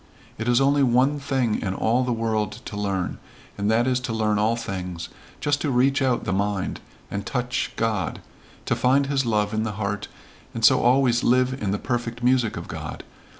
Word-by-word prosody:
It 110 - -3
is 120 0 +4
only 140 +1 +3
one 130 +3 +3
thing 130 -5 0
in 95 0 -2
all 120 +6 +2
the 125 - -1
world 110 -2 -1
to - - -6
learn, 100 -3 -2 0.4
and 100 +1 -1
that 115 +2 +3
is 130 -1 +1
to 125 -2 -4
learn 105 -2 +1
all 110 +2 +2
things, 90 -6 -5 0.3
just 145 0 0
to 150 - 0
reach 135 +2 +2
out 130 -2 +1
the 95 - -1
mind, 100 -1 -1 0.3
and 100 0 -3
touch 125 +3 -2
God 110 -4 -1 0.5
to - - +1
find 135 +2 +3
his 135 -2 0
love 105 -1 +1
in 110 - 0
the 110 -1 -2
heart 105 0 -3 0.5
and 115 -1 +2
so - - +6
always 125 -1 +3
live 130 +1 +2
in 100 - -1
the 100 - 0
perfect 120 0 -3
music 125 -3 +2
of - - -6
God. - - -6
115 Hz, 195 wpm, -24 LUFS, 105-130 Hz, 0.5 s, so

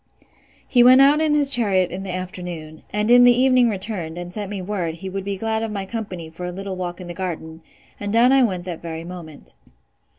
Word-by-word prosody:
He 245 -2 +4
went 255 +1 +7
out 285 +3 +5
in 305 -1 +2
his 285 -2 +5
chariot 195 -7 +3
in 185 +2 -5
the 195 - -7
afternoon; 180 -4 -6
and 210 +2 0
in 245 0 +7
the 245 0 +5
evening 255 -2 +4
returned, 190 -5 -4
and 175 0 -7
sent 205 -1 -5
me 205 -1 -5
word, 180 -4 -3
he 190 +2 -8
would 195 0 -4
be 200 0 -4
glad 220 +2 -2
of 225 - -3
my 200 -2 -4
company 190 -6 -6
for 165 +3 -10
a - - -4
little 195 +1 -6
walk 180 -1 -5
in 180 - -8
the 175 - -7
garden; 165 -3 -6 0.4
and 205 0 -4
down 235 +3 +4
I 270 0 +5
went 185 -7 -1
that 175 -3 -6
very 165 -1 -6
moment. 170 -4 -11
190 Hz, 230 wpm, -21 LUFS, 175-225 Hz, 0.4 s, went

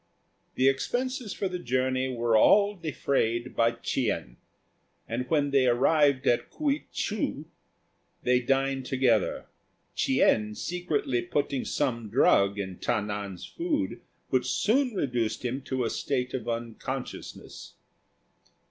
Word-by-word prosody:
The 130 - +3
expenses 245 - -1
of 190 - 0
the 180 - -3
journey 130 -1 0
were 120 -2 +1
all 205 - +5
defrayed 130 - -1
by 115 0 +3
Ch'ien; 85 - -2 0.7
and 125 +2 -3
when 145 -3 +2
they 135 -2 +4
arrived 135 +2 +3
at 120 - +2
K'uei 295 -1 -1
chou - - -2 0.8
they 125 0 +3
dined 135 +1 0
together, 125 -6 +1 0.5
Ch'ien 105 -5 +2
secretly 155 -8 -1
putting 145 -6 -1
some 120 -6 -1
drug 100 0 +4
in 95 -3 -5
Ta 115 - +1
nan's 100 -3 -5
food 315 -4 -2 0.3
which - - +1
soon 250 +1 +1
reduced 120 - -1
him 130 +3 -2
to 130 -2 -1
a 115 - 0
state 125 -3 -2
of 120 -3 -3
unconsciousness. 120 +3 -6
130 Hz, 120 wpm, -28 LUFS, 115-145 Hz, 0.8 s, all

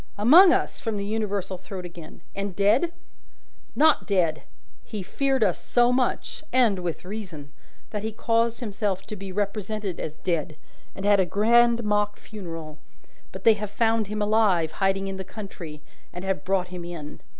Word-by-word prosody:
"Among 320 - +8
us!" - - 0
from 225 -5 -3
the 200 - -3
universal 200 -3 -2
throat 185 -1 -7
again. 170 -2 -11
"And 200 -2 -4
dead?" 210 +12 +3 0.8
"Not 315 0 +4
dead! 170 -6 +1 0.4
He 210 -3 -6
feared 270 +5 +1
us 190 -5 0
so 240 0 +3
much 250 +4 -1
and 235 -6 +3
with 175 -1 -4
reason 180 -8 -7 0.4
that 210 - -3
he 220 +1 -3
caused 230 +2 0
himself 205 -4 -2
to 215 - -7
be 195 -1 -7
represented 205 -1 -3
as 155 0 -5
dead, 165 -4 -2 0.4
and 195 - -5
had 205 -1 +5
a 190 - +4
grand 235 +4 +4
mock 210 0 +1
funeral. 165 -7 -8 0.5
But - - -9
they 225 - +7
have 210 -1 -5
found 225 0 +1
him 210 0 -2
alive, 205 -7 +3
hiding 195 0 0
in 195 0 -4
the 190 - -4
country, 180 -7 -9 0.3
and 180 +2 -7
have 190 0 -1
brought 185 -1 0
him 180 -1 -6
in. 165 -4 -8
200 Hz, 170 wpm, -25 LUFS, 180-220 Hz, 0.8 s, Among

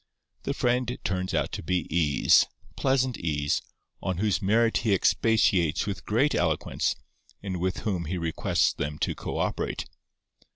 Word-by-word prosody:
The - - -1
friend 125 0 0
turns 95 0 -1
out - - 0
to - - -4
be 90 0 -1
Ease—pleasant 125 - +2
Ease—on 75 +3 -3
whose 105 0 +1
merits 115 +4 +3
he 105 -3 +2
expatiates 95 -6 +2
with 100 -4 -5
great 135 +8 +2
eloquence, 85 -3 0 0.5
and 95 -2 -3
with 90 +2 -2
whom 90 -6 -2
he 90 +4 -3
requests 80 -2 +1
them 75 +1 -4
to - - -1
co - - -5
operate. - - -2
95 Hz, 135 wpm, -27 LUFS, 85-115 Hz, 0.5 s, merits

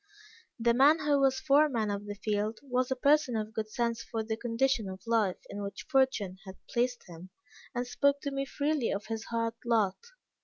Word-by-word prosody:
The 235 +1 +3
man 280 +6 +6
who 295 -2 +2
was 265 -1 +3
foreman 275 -7 +3
of 200 0 -4
the 205 - -5
field, 210 +1 -1
was 255 -2 0
a 260 - 0
person 280 -1 +3
of 215 0 -3
good 215 0 -3
sense 235 0 -1
for 225 -1 -4
the 220 0 -2
condition 230 -1 0
of 190 +3 -9
life 225 -5 +1
in 205 - -6
which 200 -1 -6
fortune 245 -9 +1
had 190 -2 -10
placed 245 +1 -1
him, 175 +1 -11 0.5
and 245 +1 -1
spoke 280 +3 +2
to 280 - -3
me 275 0 -2
freely 285 -2 -1
of 200 +1 -3
his 225 0 -4
hard 230 -1 -1
lot. 220 -5 +2
230 Hz, 195 wpm, -30 LUFS, 215-270 Hz, 0.5 s, man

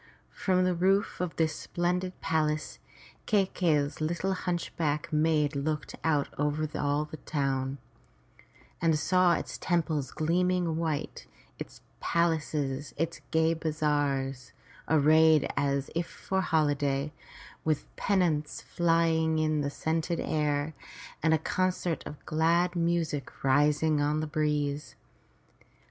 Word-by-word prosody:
From 185 -1 +1
the 185 0 +2
roof 190 +2 +1
of 180 -2 -3
this 160 -2 +1
splendid 180 +1 -2
palace, 155 -1 -1 0.5
Kai 205 -3 +3
key'i's 155 -6 0
little 175 +5 0
hunchbacked 165 -5 -2
maid 150 -1 +2
looked 150 +2 -2
out 150 -3 +2
over 150 +1 0
all 145 +1 0
the 155 - -9
town, 135 -2 -2 1.0
and 165 -2 +3
saw 180 +3 +3
its - - -4
temples 160 -6 0
gleaming 175 +1 +1
white, 160 -3 -3 0.3
its - - -8 0.2
palaces 150 -4 -1
and 165 +2 -2
gay 160 0 +3
bazaars 145 -5 -1 0.4
arrayed 155 0 +5
as 140 -1 0
if 170 0 -1
for 190 0 -2
holiday, 145 -3 +1 0.5
with 155 -2 0
pennons 170 -7 0
flying 165 -1 +2
in 155 -1 +1
the 140 - -1
scented 160 +3 -1
air, 150 0 0 0.5
and 160 0 +2
concert 185 -3 -1
of 150 - -10
glad 170 +3 +2
music 165 -5 -1
rising 145 +2 +3
on 150 +1 +1
the 155 - -1
breeze. 150 -1 -1
155 Hz, 115 wpm, -29 LUFS, 145-170 Hz, 1.0 s, arrayed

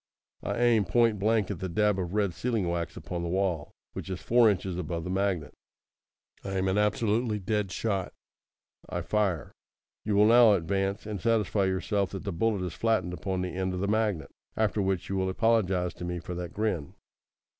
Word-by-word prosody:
I - - -3
aim 120 -4 +4
point 115 +3 +3
blank 110 0 +2
at - - -5
the 95 -1 -3
dab 105 +2 +2
of 90 +1 -3
red 100 -4 +1
sealing 115 -5 -1
wax 85 -1 -3
upon 85 -1 -5
the 85 - -3
wall, 90 -4 0 0.2
which - - -6
is 95 - -3
four 120 -1 +4
inches 95 -2 -1
above 85 -1 -3
the 90 - -4
magnet. 95 -4 -1 0.9
I 95 - -4
am 95 0 0
an 95 +2 +2
absolutely 105 +2 +1
dead 105 0 -1
shot. 100 -4 -2 0.8
I - - -2
fire. 100 -7 0 0.5
You 105 -1 0
will 105 +1 +6
now 115 -1 +7
advance, 95 +3 -1
and 105 -3 -5
satisfy 110 -3 +2
yourself 95 +1 0
that 95 - -5
the 100 -2 -3
bullet 100 +1 0
is 90 - -4
flattened 110 -6 0
upon 90 +2 -2
the 90 -2 -4
end 95 0 -2
of - - -3
the 100 - -1
magnet, 105 -6 0 0.3
after 110 -1 +1
which 95 -2 -1
you 95 - -2
will 95 0 0
apologise 95 -4 +1
to - - -9
me 90 0 -3
for 90 +1 -6
that 90 -1 -5
grin." 100 -9 -2
95 Hz, 195 wpm, -28 LUFS, 90-105 Hz, 0.9 s, now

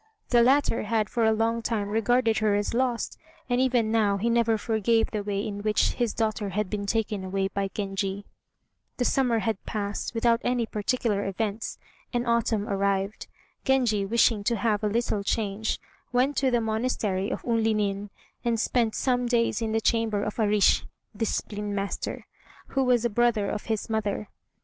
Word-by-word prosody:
The 240 -1 +5
latter 265 0 +3
had 215 0 0
for 230 -2 +1
a 220 - +5
long 225 +1 +1
time 220 -3 -1
regarded 225 +1 +2
her 215 -1 +2
as 205 +2 -1
lost, 245 -1 -1 0.3
and 245 0 +1
even 245 -4 +2
now 210 -3 +2
he 230 +4 0
never 230 -1 +3
forgave 225 +1 +1
the 215 - -2
way 200 0 -2
in 205 -1 -4
which 215 0 +2
his 240 -3 0
daughter 215 -2 -1
had 200 0 -2
been 205 -1 -3
taken 210 -2 -1
away 195 +1 -1
by 195 0 -2
Genji. 195 0 -3 0.7
The 245 - 0
summer 250 -3 +2
had 220 -4 -1
passed 205 +1 -3
without 230 +1 +2
any 245 -1 +1
particular 215 -1 -1
events, 210 +2 -3 0.3
and 240 -1 -1
autumn 230 -3 +1
arrived. 200 +1 -1 0.4
Genji, 245 -7 +2
wishing 225 0 +2
to 235 - +2
have 215 -1 0
a - - +2
little 215 -2 0
change, 215 0 -1 0.3
went 255 +4 +2
to 265 - +3
the 240 -2 +2
monastery 220 -4 -1
of - - -4
Unlinin, 215 -3 0 0.3
and 235 -1 +1
spent 230 -1 +1
some 250 -2 +1
days 235 -1 +1
in 225 -1 -1
the 225 - +2
chamber 220 -3 +1
of 210 +2 -4
a 215 - +3
rissh 205 -1 +4 0.3
(discipline 210 -1 -2
master), 200 0 -3 0.4
who 270 - +1
was 245 -2 +3
a - - +2
brother 235 -2 +2
of 210 - -4
his 220 -2 -2
mother. 215 -1 -2
220 Hz, 175 wpm, -26 LUFS, 205-235 Hz, 0.7 s, The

